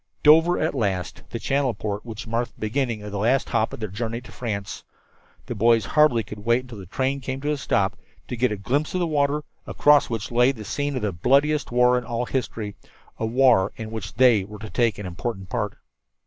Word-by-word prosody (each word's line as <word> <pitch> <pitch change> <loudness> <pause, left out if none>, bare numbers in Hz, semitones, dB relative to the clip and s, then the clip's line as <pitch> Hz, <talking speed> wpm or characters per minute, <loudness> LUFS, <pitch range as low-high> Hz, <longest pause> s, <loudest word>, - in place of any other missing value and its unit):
Dover 160 +4 +6
at 160 - 0
last 95 -8 -2
the - - -4
channel 135 0 0
port 105 0 -4
which 115 -2 -7
marked 115 +1 -2
the - - -24
beginning 115 -1 -1
of 105 - -7
the 100 - -3
last 125 +6 +1
lap 110 -1 +2
of - - -8
their 110 - -3
journey 115 +4 -3
to 125 - -14
France! 100 -5 -5 0.6
The - - -4
boys 115 0 +3
hardly 150 -6 +3
could 105 - -9
wait 120 +4 +1
until 120 -5 -10
the 95 - -10
train 135 +7 -1
came 130 0 -4
to 145 +1 -1
a 150 - -1
stop, 140 - 0 0.3
to - - -4
get 120 0 +1
a 105 - -2
glimpse 140 - -1
of - - +1
the 175 - +1
water, 150 -1 +1 0.2
across 145 0 +4
which 115 -2 -4
lay 125 +2 +4
the 110 -4 -9
scene 145 +6 -2
of 130 - -3
the 105 - 0
bloodiest 140 - +2
war 125 +1 +4
in - - -9
all 120 +1 -2
history 115 -6 -3 0.4
a 110 - -1
war 120 -5 +4
in 110 -1 -7
which 105 -3 -6
they 120 -4 +5
were 105 +2 -10
to 110 +1 -9
take 115 -4 +1
an 105 - -6
important 95 +2 -5
part. - - -2
120 Hz, 225 wpm, -24 LUFS, 105-135 Hz, 0.6 s, Dover